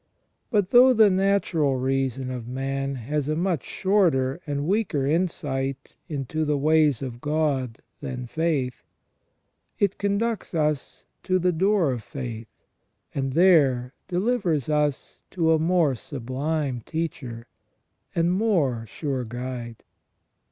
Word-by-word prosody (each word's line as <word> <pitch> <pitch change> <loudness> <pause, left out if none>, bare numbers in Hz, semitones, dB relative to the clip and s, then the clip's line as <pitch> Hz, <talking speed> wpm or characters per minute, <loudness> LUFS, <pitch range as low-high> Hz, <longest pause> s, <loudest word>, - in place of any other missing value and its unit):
But 205 -5 +1
though 255 +2 +8
the 215 -3 +6
natural 185 -7 +2
reason 130 0 -1
of 125 -2 -6
man 135 +2 -2
has 140 +4 -2
a 155 - 0
much 170 -3 0
shorter 170 -8 +1
and 145 0 -2
weaker 185 -7 0
insight 140 -4 -1 0.2
into 150 +1 -2
the 150 -1 +1
ways 150 -3 +3
of 120 -2 -6
God 145 -6 -1 0.2
than 130 -3 -5
faith, 145 -3 -1 1.0
it 200 -2 0
conducts 200 0 -1
us 150 -3 -1 0.2
to 185 - +1
the 180 0 +2
door 185 -2 +2
of 120 -3 -3
faith, 115 -1 -6 0.7
and 135 -1 -2
there 140 -8 +4
delivers 180 - 0
us 150 -2 -1
to 165 -3 +1
a 160 - +3
more 165 -3 +3
sublime 135 +2 -3
teacher, 130 -8 -4 0.7
and 170 +1 +2
more 160 - +1
sure 135 +2 -3
guide. 120 0 -6
150 Hz, 125 wpm, -25 LUFS, 130-175 Hz, 1.0 s, though